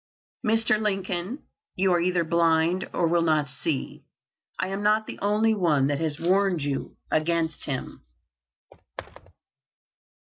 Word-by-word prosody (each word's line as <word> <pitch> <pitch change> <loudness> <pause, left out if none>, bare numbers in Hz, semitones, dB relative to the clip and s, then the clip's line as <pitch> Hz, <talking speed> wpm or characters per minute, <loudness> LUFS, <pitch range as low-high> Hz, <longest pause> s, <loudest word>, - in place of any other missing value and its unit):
"Mr. 220 0 +2
Lincoln, 195 - -2 0.3
you 185 0 +2
are 175 - +3
either 180 0 +1
blind 165 +2 +2
or 175 - 0
will 170 +1 +2
not 155 -3 +2
see. 140 +1 -4 0.5
I - - -2
am 195 +1 -3
not 215 +1 +2
the - - -8
only 215 +2 +2
one 165 -9 +2
that 145 0 0
has 155 -2 -2
warned 185 -2 +2
you 140 -1 -4
against 160 0 0
him." 135 -3 -5
175 Hz, 125 wpm, -25 LUFS, 160-195 Hz, 0.5 s, are